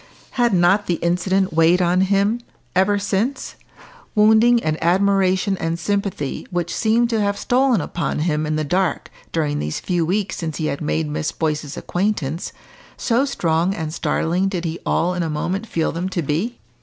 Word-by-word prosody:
Had 240 -2 +2
not 190 +3 +3
the 175 - +1
incident 185 +3 0
weighed 165 +3 +4
on 180 +1 +2
him 200 +4 +2 0.4
ever 190 +2 +3
since, 205 +7 -2 0.6
wounding 220 +3 +5
an 155 0 -1
admiration 190 +2 +2
and 165 0 -1
sympathy 195 -5 -2
which 175 -1 -2
seemed 230 +2 +2
to 225 -2 +1
have 200 0 0
stolen 250 -3 +2
upon 165 -1 -3
him 155 -1 0
in 155 - 0
the 155 - 0
dark, 180 +4 -1 0.2
during 150 -3 -1
these 75 +1 -3
few 175 -2 0
weeks 195 +4 -1
since 160 -3 -4
he 155 - -2
had 140 - -2
made 75 0 -1
Miss 75 +1 -2
Boyce's 150 -2 -3
acquaintance, 175 -5 -2 0.5
so 245 +3 +1
strong 170 - 0
and 160 -2 -4
startling 175 +3 0
did 180 -3 -3
he 165 +1 -3
all 180 +2 +1
in 180 - -2
a 165 - -1
moment 180 +8 -2
feel 165 -5 -1
them 175 +3 -3
to 175 -3 -2
be? 170 - -2
180 Hz, 175 wpm, -21 LUFS, 160-200 Hz, 0.6 s, wounding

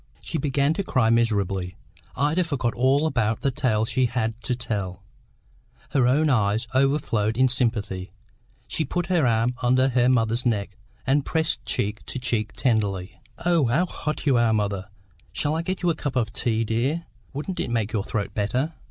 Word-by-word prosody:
She - - -4
began 140 +1 +1
to 195 - -2
cry 125 -10 +2
miserably. 100 -5 +1 0.4
Ida 150 +6 +2
forgot 135 -8 -1
all 135 +5 +3
about 115 -7 0
the 140 - +1
tale 110 -4 +1
she 125 +2 +1
had 115 -2 -1
to 125 +1 -1
tell; 95 -6 -4 0.9
her 130 -3 +3
own 150 +5 +3
eyes 110 -4 +2
overflowed 130 -5 +1
in 130 0 +5
sympathy. 105 -7 -1 0.6
She 160 - -1
put 175 +5 -2
her 160 -7 +3
arm 115 +1 +2
under 130 +2 +3
her 125 -1 +3
mother's 115 -1 +2
neck, 100 -5 -1 0.3
and 140 +2 +2
pressed 160 +2 -1
cheek 105 +1 -1
to - - -3
cheek 110 -4 -1
tenderly. 105 -5 0 0.2
"Oh, 170 -5 +4
how 145 +10 +2
hot 155 -4 -4
you 135 -4 +4
are, 120 -1 +3
mother! 100 -2 -1 0.4
Shall 145 - 0
I 160 - 0
get 185 +2 -3
you 175 - +4
a - - -2
cup 140 -3 -4
of 115 -4 0
tea, 115 -1 0
dear? 130 +10 -1 0.3
Wouldn't 155 +7 -4
it - - -1
make 115 -2 -1
your 105 -3 0
throat 105 -1 -3
better?" 125 +10 -1
120 Hz, 180 wpm, -24 LUFS, 110-140 Hz, 0.9 s, in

